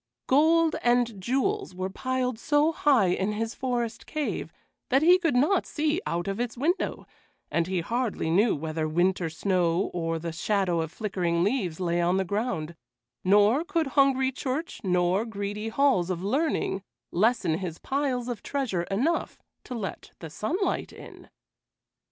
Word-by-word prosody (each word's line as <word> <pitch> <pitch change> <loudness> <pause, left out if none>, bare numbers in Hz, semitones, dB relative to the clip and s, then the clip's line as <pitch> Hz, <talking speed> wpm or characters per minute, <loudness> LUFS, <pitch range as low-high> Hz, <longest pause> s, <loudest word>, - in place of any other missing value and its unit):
Gold 320 +4 +4
and 240 -4 +1
jewels 275 - -1
were 185 +1 -3
piled 255 +1 -2
so 295 +4 +3
high 270 - +3
in 190 +4 0
his 225 +1 -2
forest 240 -3 -3
cave 305 -2 -3 0.4
that 270 +2 +3
he 355 +3 +7
could 330 -8 +1
not 305 +9 +3
see 310 +3 0
out 170 +2 -2
of 195 +2 -2
its 245 0 -3
window, 330 +9 -1 0.5
and 170 0 +1
he 185 -2 -1
hardly 230 -3 -1
knew 210 +7 +3
whether 155 +1 -3
winter 175 +2 +1
snow 175 +1 0
or 165 -1 -1
the 165 +1 -4
shadow 180 0 0
of 160 -1 -4
flickering 175 -6 -1
leaves 195 -6 -1
lay 175 -1 0
on 175 +2 +2
the 190 - 0
ground, 185 -5 -2 0.5
nor 210 - +4
could 335 -5 -1
hungry 265 -2 +3
church 270 +5 -4
nor 180 +1 +2
greedy 210 -1 -4
halls 225 -8 +2
of 180 -1 -3
learning 265 -3 0 0.3
lessen 185 -4 +2
his 175 -4 -5
piles 265 -3 -1
of 240 -4 -4
treasure 235 -12 -2
enough 270 +13 0 0.3
to 250 - -7
let 210 -5 -6
the 160 -3 -9
sunlight 355 - -1
in. - - -13
215 Hz, 155 wpm, -27 LUFS, 180-270 Hz, 0.5 s, he